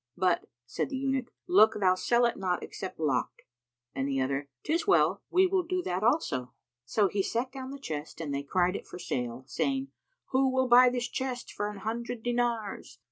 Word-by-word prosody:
"But," 180 -2 +1 0.2
said 120 - -3
the 270 - -3
Eunuch, 265 -2 -1 0.2
"look 215 +5 +6
thou 185 -2 +4
sell 235 +6 +2
it 235 - +1
not 180 -2 -1
except 190 - -7
locked;" 140 -6 -1 0.5
and 135 0 -1
the 135 -1 0
other, 135 +2 -1
"'Tis 330 +2 0
well; 170 +4 +4
we 370 +2 +5
will 375 0 +2
do 360 +1 -2
that 180 - -2
also."[FN#289] 145 - +1 0.3
So 205 - +2
he 200 +1 0
set 235 +6 -1
down 260 -1 -7
the 280 - -6
chest, 155 - -6
and 150 -4 -3
they 140 - -1
cried 180 +6 +1
it - - -6
for - - -8
sale, 125 -6 -3
saying, 270 - -1 0.4
"Who 265 0 +3
will 260 0 +1
buy 250 +1 +8
this 245 -1 -2
chest 260 -2 -4
for 205 0 -2
an 210 - -8
hundred 230 +2 -4
dinars?" 235 - -2
220 Hz, 195 wpm, -29 LUFS, 165-260 Hz, 0.5 s, buy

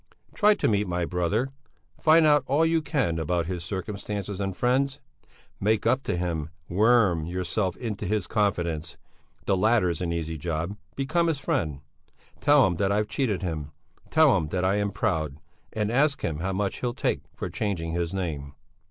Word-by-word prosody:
Try 210 0 +4
to - - 0
meet 105 -1 +1
my 90 -1 -1
brother; 95 +10 0 0.5
find 160 0 +6
out 150 -2 +5
all 145 +5 +3
you 165 0 +2
can 135 - 0
about 85 +1 0
his 90 -1 -4
circumstances 100 +1 -4
and 95 -2 -3
friends! 135 +3 +1 0.6
Make 105 +1 +1
up 130 +4 +3
to - - -1
him, 85 -3 -2 0.2
worm 100 -5 +3
yourself 90 +1 -1
into 110 -7 -4
his 105 -1 0
confidence 85 -6 -1 0.5
the 100 - +2
latter's 95 -5 +2
an 85 -2 -1
easy 80 -1 -3
job 85 +4 -2 0.2
become 160 +5 +1
his 160 -3 +1
friend! 75 - -1 0.6
Tell 145 -3 +5
him 90 -2 0
that 95 +2 +1
I've 105 +1 +1
cheated 110 -10 -1
him, 75 -5 -4 0.4
tell 155 -4 +5
him 80 -4 -1
that 90 +3 -1
I 95 +2 +2
am 100 0 0
proud, 80 -10 -1 0.3
and 105 0 -1
ask 140 +3 +2
him 80 -2 -2
how 95 +3 -1
much 95 +1 -2
he'll 120 -1 -2
take 140 - 0
for - - -4
changing 90 -6 -2
his 85 0 -1
name." 75 -7 -4
95 Hz, 175 wpm, -26 LUFS, 85-120 Hz, 0.6 s, find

